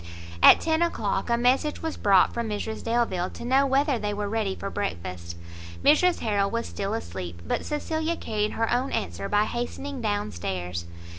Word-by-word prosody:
At - - +9
ten 320 0 +1
o'clock, 215 - 0
a 235 - +3
message 260 +6 +1
was 320 -1 -2
brought 195 -3 +4
from 235 -1 -2
Mrs 215 +1 -4
Delvile, 230 -6 0
to - - -9
know 270 +3 +3
whether 275 -1 +2
they 210 -1 -2
were 205 0 -2
ready 205 -2 -1
for 195 - -5
breakfast. 85 - -4 0.5
Mrs 340 +5 +4
Harrel 200 -3 +1
was 230 +2 -2
still 200 +2 -3
asleep, 85 - -6
but - - -2
Cecilia 315 +2 -1
carried 210 -1 -2
her 225 +1 0
own 255 +3 0
answer 95 +1 -3
by 205 0 +3
hastening 250 +4 -4
down 205 -2 -1
stairs. 90 0 -4
215 Hz, 175 wpm, -26 LUFS, 190-260 Hz, 0.5 s, At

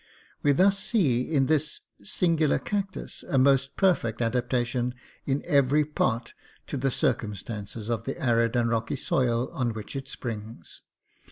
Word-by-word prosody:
We 145 - +4
thus 195 +7 +4
see 155 - +2
in 140 -4 +3
this 155 +1 0 0.2
singular 160 - +2
cactus 200 -2 -4
a 135 - +2
most 135 +1 +3
perfect 160 - +2
adaptation 120 +1 0 0.3
in 140 +1 0
every 140 +1 +3
part 120 -5 -1 0.3
to 145 - -4
the 135 +1 +1
cir 125 - +2
cumstances 105 0 -6
of 115 -1 -2
the 135 - -4
arid 115 -4 +2
and 120 -1 +2
rocky 115 +4 -1
soil 125 -2 0
on 120 -3 -1
which 110 +4 -7
it 135 -1 -4
springs. 110 - -7
130 Hz, 150 wpm, -27 LUFS, 115-145 Hz, 0.3 s, We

